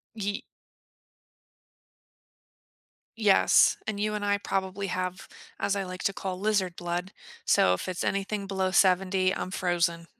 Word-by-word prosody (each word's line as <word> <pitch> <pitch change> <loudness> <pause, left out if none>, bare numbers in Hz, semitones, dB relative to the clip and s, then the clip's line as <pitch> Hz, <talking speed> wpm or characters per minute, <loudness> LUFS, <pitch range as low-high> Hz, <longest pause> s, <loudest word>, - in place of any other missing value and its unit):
Ye 205 -1 -3 2.8
Yes. 210 -3 +5
And 215 -2 -3
you 210 0 0
and 210 -1 -3
I 205 0 +2
probably 195 0 -2
have, 185 0 -4 0.3
as 200 - 0
I 200 - -1
like 185 0 -7
to 195 - +2
call, 190 -1 -5
lizard 195 -3 0
blood. 175 +2 -4 0.3
So, 90 - +4
if 90 - -5
it's 185 - -3
anything 195 +1 -2
below 190 -1 -1
70, 185 0 +3
I'm - - -4
frozen. 170 -2 0
190 Hz, 135 wpm, -27 LUFS, 185-200 Hz, 2.8 s, Yes